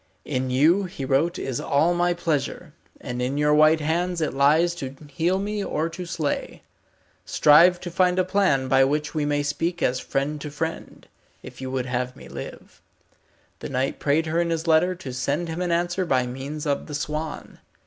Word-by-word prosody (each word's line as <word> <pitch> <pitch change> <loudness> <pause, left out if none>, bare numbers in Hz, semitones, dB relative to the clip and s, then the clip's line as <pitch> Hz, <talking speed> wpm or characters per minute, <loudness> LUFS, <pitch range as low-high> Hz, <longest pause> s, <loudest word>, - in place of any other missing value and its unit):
In 130 0 -2
you 160 +10 +3
he 160 -7 -6
wrote 150 +7 +1
is 130 -3 -3
all 155 +5 +2
my 175 0 +1
pleasure, 160 -4 -2 0.3
and 125 0 -5
in 130 +3 -1
your 150 0 +3
white 155 +1 +5
hands 170 +3 -1
it 155 -5 -1
lies 155 +5 +3
to 135 -6 -6 0.2
heal 170 +6 +1
me 205 +1 -2
or 160 -3 -1
to 175 +2 -7
slay. 160 -4 -3 0.6
Strive 170 +4 +5
to 175 - -6
find 180 +1 +2
a 185 - +4
plan 185 -9 +1
by 135 0 +5
which 150 +2 -1
we 155 -2 -1
may 145 0 0
speak 165 +4 -2
as 125 +1 +1
friend 145 +2 -2
to 150 - -5
friend, 160 +3 -5 0.4
if - - -11
you 130 - -4
would 130 -1 -2
have 125 0 -2
me - - -12
live. 65 +2 -10 0.8
The - - -6
knight 135 0 -1
prayed 150 +3 +1
her 165 +2 0
in 170 - -1
his 165 0 -2
letter 165 +3 +3
to 140 -8 -8
send 140 +7 -2
him 165 +2 -4
an 180 -1 -1
answer 175 +2 0
by 130 -7 +1
means 135 +5 -6
of 140 -1 -1
the 150 - -5
swan. 150 +1 -5
155 Hz, 195 wpm, -24 LUFS, 135-175 Hz, 0.8 s, white